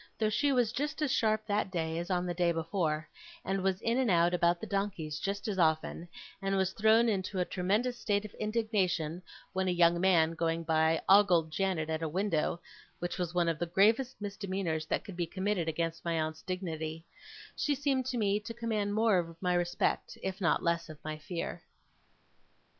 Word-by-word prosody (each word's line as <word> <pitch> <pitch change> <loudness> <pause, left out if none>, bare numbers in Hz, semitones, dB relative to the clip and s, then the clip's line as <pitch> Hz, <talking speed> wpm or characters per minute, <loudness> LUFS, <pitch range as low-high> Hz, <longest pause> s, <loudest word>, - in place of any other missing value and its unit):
Though 215 -1 +1
she 285 +6 +2
was 245 -4 +2
just 295 +5 -3
as 285 - +1
sharp 215 -2 +1
that 205 -2 0
day 165 -2 -2
as 175 - -5
on 180 -1 0
the 175 - -2
day 175 0 +2
before, 160 -2 -1 0.4
and 195 +1 -1
was 190 0 0
in 230 +3 +1
and 255 -4 +2
out 170 -1 +4
about 170 0 +2
the - - -5
donkeys 195 -7 -2
just 200 +2 -3
as 200 -3 -2
often, 160 +1 +1 0.3
and 195 0 0
was 190 0 +1
thrown 220 +2 +4
into 195 -2 -1
a 180 - +1
tremendous 210 +8 0
state 205 0 0
of 210 - -9
indignation, 195 -7 0 0.3
when 190 0 0
a - - +2
young 170 -1 +4
man, 170 -4 +4
going 165 0 -1
by, 160 0 +2
ogled 180 -5 +5
Janet 185 -3 0
at 160 0 -2
a 160 - -1
window 175 -1 0 0.4
(which 175 +2 -4
was 175 -1 -2
one 175 -1 +2
of 165 -2 0
the 175 - -1
gravest 225 +9 +2
misdemeanours 195 -6 -3
that - - -1
could 200 - -9
be 175 -1 -2
committed 190 -1 -1
against 165 +1 -2
my 165 -1 0
aunt's 155 0 -3
dignity), 165 -3 -4 0.5
she 290 - 0
seemed 270 -2 0
to 250 - -2
me 205 -2 +2
to 230 +2 -8
command 215 -3 -1
more 220 -4 +4
of 165 -1 -6
my 180 0 +1
respect, 175 0 0
if 190 +1 -4
not 170 - +2
less 170 -1 0
of 155 - -9
my 155 0 -4
fear. 170 +2 -5
185 Hz, 195 wpm, -31 LUFS, 165-210 Hz, 0.5 s, ogled